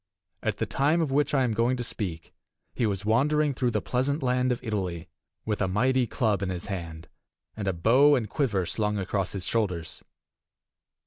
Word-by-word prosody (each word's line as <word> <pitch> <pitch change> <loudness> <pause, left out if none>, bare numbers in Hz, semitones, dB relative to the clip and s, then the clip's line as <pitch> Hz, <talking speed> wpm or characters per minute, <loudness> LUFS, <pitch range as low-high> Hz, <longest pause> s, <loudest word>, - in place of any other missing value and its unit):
At - - -1
the - - -1
time 150 +5 +1
of 160 -5 0
which 145 +2 +2
I 135 - +3
am 120 -3 0
going 120 +4 +1
to 120 - -3
speak 90 -8 -5 0.4
he 115 - 0
was 100 -1 -3
wandering 145 +6 +2
through 125 -1 0
the - - -1
pleasant 140 +4 -1
land 125 0 +2
of 125 - -1
Italy, 95 -6 -3 0.4
with 105 -2 -2
a 95 - +2
mighty 125 +6 +2
club 110 -4 0
in 100 - -1
his 90 -2 -4
hand, 85 -5 -6 0.5
and 105 -3 -4
a - - +3
bow 130 +12 +5
and 120 -5 -1
quiver 105 - 0
slung 105 +4 -1
across 95 0 -1
his 95 -2 -2
shoulders. 90 -8 -2
110 Hz, 190 wpm, -27 LUFS, 95-130 Hz, 0.5 s, bow